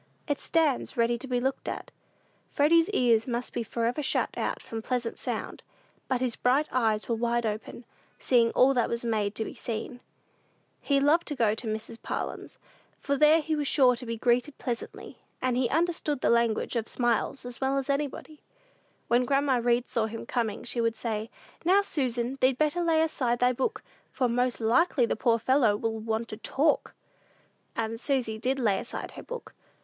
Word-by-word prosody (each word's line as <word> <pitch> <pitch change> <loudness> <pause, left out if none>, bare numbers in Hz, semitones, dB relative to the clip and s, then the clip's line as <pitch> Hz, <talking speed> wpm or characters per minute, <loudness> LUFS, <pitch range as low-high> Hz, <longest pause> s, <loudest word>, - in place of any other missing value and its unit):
It 290 -2 -1
stands 305 -5 0
ready 235 0 +2
to 270 - -7
be 250 -1 0
looked 265 +2 -2
at. - - -6 0.6
Freddy's 330 +4 +4
ears 235 - +3
must 240 0 -3
be 240 - -2
forever 235 +4 -1
shut 280 - 0
out - - -2
from 225 -1 -6
pleasant 240 0 -2
sound; - - -4 0.5
but 255 -2 0
his 250 -3 0
bright 270 +5 +2
eyes 220 -4 +1
were 235 - 0
wide 235 +1 0
open, 215 +2 -5 0.3
seeing 235 -3 +3
all 270 +2 +5
that 245 -3 +1
was 235 0 -2
made 215 -2 0
to 220 - -2
be - - -7
seen. 240 +2 -5 0.8
He 280 -1 +2
loved 305 +5 +3
to 295 - -3
go 225 -5 +2
to 220 +1 -6
Mrs. 220 +1 -5
Parlin's, - - -5 0.4
for 280 - -1
there 305 +3 +5
he 315 +1 -1
was 295 -2 -1
sure 255 -4 +5
to 245 +1 -9
be 230 0 -3
greeted 245 +5 +1
pleasantly; 240 -2 -6 0.2
and 255 -1 0
he 250 -1 +1
understood 320 -3 0
the - - +3
language 235 0 +1
of 230 -1 -1
smiles 240 +2 0
as 245 +1 -7
well 270 +1 +1
as 270 -1 -2
anybody. 290 +2 -3 0.7
When 240 +1 +3
grandma 275 0 +2
Read 240 0 +2
saw 225 -2 0
him 225 +1 -7
coming 230 -4 -2
she 240 0 -1
would 230 0 +1
say, 220 -1 -3 0.3
"Now, 380 +4 +4
Susan, 255 -6 -1
thee'd 255 0 +3
better 305 +4 +1
lay 320 -1 +3
aside 250 -6 0
thy 250 +1 +3
book, 255 +1 -2 0.3
for 255 - +1
most 245 +1 0
likely 245 +4 +3
the - - -1
poor 230 +2 +2
little 230 0 -2
fellow 255 -6 +4
will 225 0 -2
want 220 +1 -2
to 215 - -6
talk." 280 +7 0 0.8
And 225 0 -2
Susy 245 -5 -1
did 260 +4 0
lay 215 -7 +1
aside - - -6
her - - -9
book. - - -8
245 Hz, 190 wpm, -28 LUFS, 230-275 Hz, 0.8 s, all